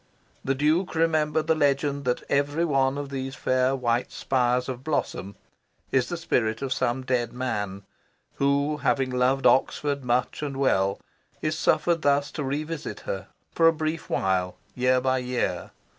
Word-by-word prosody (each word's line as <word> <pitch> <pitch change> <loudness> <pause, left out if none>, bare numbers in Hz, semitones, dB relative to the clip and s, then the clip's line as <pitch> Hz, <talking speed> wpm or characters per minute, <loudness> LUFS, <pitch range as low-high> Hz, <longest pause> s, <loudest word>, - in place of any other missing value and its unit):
The 135 - 0
Duke 155 +6 +1
remembered 155 -1 +2
the 160 - +3
legend 140 -2 +1
that 125 -1 0
every 145 +4 +1
one 135 -3 +1
of 145 -1 -4
these 135 0 -4
fair 130 +1 +1
white 120 -1 0
spires 125 -1 0
of 130 -1 -5
blossom 135 -9 -2 0.6
is 130 -2 +2
the 175 - -3
spirit 110 -8 0
of 135 -1 0
some 130 -1 -1
dead 125 -2 0
man 105 -6 -3 0.5
who, 140 +2 +1
having 135 -2 +1
loved 130 +2 +1
Oxford 140 +1 +2
much 125 +3 0
and 140 -2 -4
well, 100 -8 +2 0.4
is 155 0 0
suffered 160 +2 +2
thus 145 0 +2
to 150 - -4
revisit 150 +3 -4
her, - - -5 0.3
for 165 - +4
a - - +7
brief 155 0 -3
while, 90 -1 0 0.2
year 125 0 +2
by 130 0 +1
year. 125 -8 -2
135 Hz, 160 wpm, -26 LUFS, 125-150 Hz, 0.6 s, a